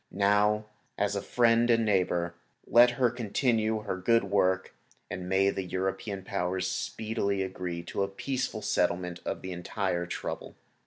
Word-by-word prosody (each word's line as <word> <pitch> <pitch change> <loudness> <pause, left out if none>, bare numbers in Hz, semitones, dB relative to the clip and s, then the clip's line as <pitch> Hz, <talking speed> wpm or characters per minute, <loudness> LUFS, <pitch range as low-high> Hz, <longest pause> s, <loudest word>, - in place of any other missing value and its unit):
Now, 105 +2 +2 0.3
as 100 0 0
a 100 - -1
friend 120 0 +3
and 115 -1 +4
neighbor, 90 -4 +1 0.3
let 120 +1 +7
her 125 -3 +3
continue 110 -1 0
her 95 -3 -3
good 115 +5 +3
work, 95 -1 +1 0.4
and 90 0 -5
may 95 +1 +3
the 95 - -3
European 95 +2 -3
Powers 95 -1 -1
speedily 100 -1 -1
agree 90 -2 -4
to 85 - -3
a 100 - +2
peaceful 115 +2 -3
settlement 90 0 0
of - - -3
the 95 - -5
entire 90 0 -2
trouble. - - -5
100 Hz, 150 wpm, -29 LUFS, 95-110 Hz, 0.4 s, let